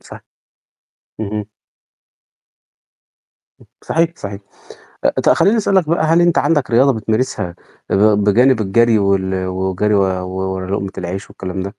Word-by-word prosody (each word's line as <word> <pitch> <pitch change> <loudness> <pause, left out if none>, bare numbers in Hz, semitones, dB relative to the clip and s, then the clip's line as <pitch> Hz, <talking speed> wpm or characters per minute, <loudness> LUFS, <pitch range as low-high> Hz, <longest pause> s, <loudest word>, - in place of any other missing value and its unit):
صح - - -12 1.0
اهم. 105 0 -4 2.1
آه. - - -18 0.2
صحيح 165 +1 0
صحيح. 100 0 -7 0.8
ط - - +4
خلّيني 210 +4 +3
أسألك 190 -6 +1
بقى 165 -1 +1
هل 165 +2 +3
أنت 175 -1 +2
عندك 150 -7 +1
رياضة 130 +4 +4
بتمارسها 110 -4 -2 0.3
بجانب 110 +4 +3
الجري 110 +3 +3
وال 95 -1 0
والجري 95 +3 -1
و 100 - +3 0.3
ورا 95 0 -4
لقمة 100 -1 -2
العيش 90 +2 -5
والكلام 95 0 -6
ده؟ - - -4
105 Hz, 120 wpm, -17 LUFS, 95-130 Hz, 2.1 s, ط